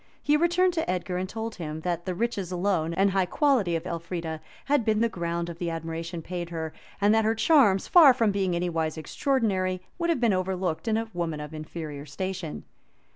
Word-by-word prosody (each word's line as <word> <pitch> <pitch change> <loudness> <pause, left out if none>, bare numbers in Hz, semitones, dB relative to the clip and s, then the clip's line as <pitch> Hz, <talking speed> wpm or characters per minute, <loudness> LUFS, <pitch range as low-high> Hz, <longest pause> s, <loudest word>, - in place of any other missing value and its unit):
He 295 - +3
returned 350 +3 +3
to 325 -1 -2
Edgar, 180 0 -1
and 185 +1 -3
told 225 +2 -4
him, 160 -2 -5
that 175 0 -2
the 185 - -1
riches 205 -4 -2
alone, 180 -3 0
and 195 +3 +2
high 190 -1 +1
quality 240 - +2
of 165 +1 -3
Elfrida, 170 -2 -4 0.2
had 285 -3 +2
been 215 -1 +2
the 235 - +4
ground 170 -3 -3
of 170 -1 -8
the 175 - -1
admiration 165 +1 -5
paid 175 -1 -5
her, 160 -2 -4 0.3
and 205 +1 +4
that 220 0 +4
her 220 +1 +2
charms, 220 - +4
far 325 -6 +8
from 230 -4 +2
being 190 -3 0
any 175 +1 0
wise 160 -2 -1
extraordinary 185 - 0 0.2
would 340 0 0
have 330 - +2
been 235 -4 +3
overlooked 185 -1 -2
in 220 -1 +2
a 225 0 -3
woman 165 -3 -2
of 150 +1 -7
inferior 155 -2 -7
station. 185 +1 -4
185 Hz, 205 wpm, -27 LUFS, 165-220 Hz, 0.3 s, far